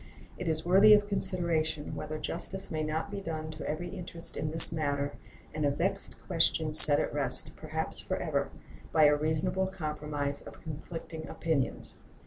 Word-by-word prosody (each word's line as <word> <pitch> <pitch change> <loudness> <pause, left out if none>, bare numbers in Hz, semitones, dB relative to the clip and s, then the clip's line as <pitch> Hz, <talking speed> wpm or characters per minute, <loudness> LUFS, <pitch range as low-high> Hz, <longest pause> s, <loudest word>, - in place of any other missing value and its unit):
It 180 - -6
is 160 0 -2
worthy 195 +4 +7
of 205 0 0
consideration 170 -6 0
whether 155 0 -5
justice 190 +4 -6
may 155 -1 -2
not 155 +5 -3
be 200 -1 -5
done 155 -3 -5
to 155 0 -7
every 175 +3 -4
interest 175 -3 -6
in 150 - -3
this 160 +1 +7
matter, 145 -3 -2 0.4
and 155 - -3
a 145 - +3
vexed 140 - -2
question - - 0
set - - +10
at - - -2
rest, - - -1
perhaps - - -5
forever, - - -2 0.4
by 155 - +4
a 150 0 +6
reasonable 155 +5 -1
compromise 150 -5 -4
of - - -13
conflicting 160 +1 -8
opinions. 160 -6 -2
160 Hz, 160 wpm, -29 LUFS, 150-175 Hz, 0.4 s, set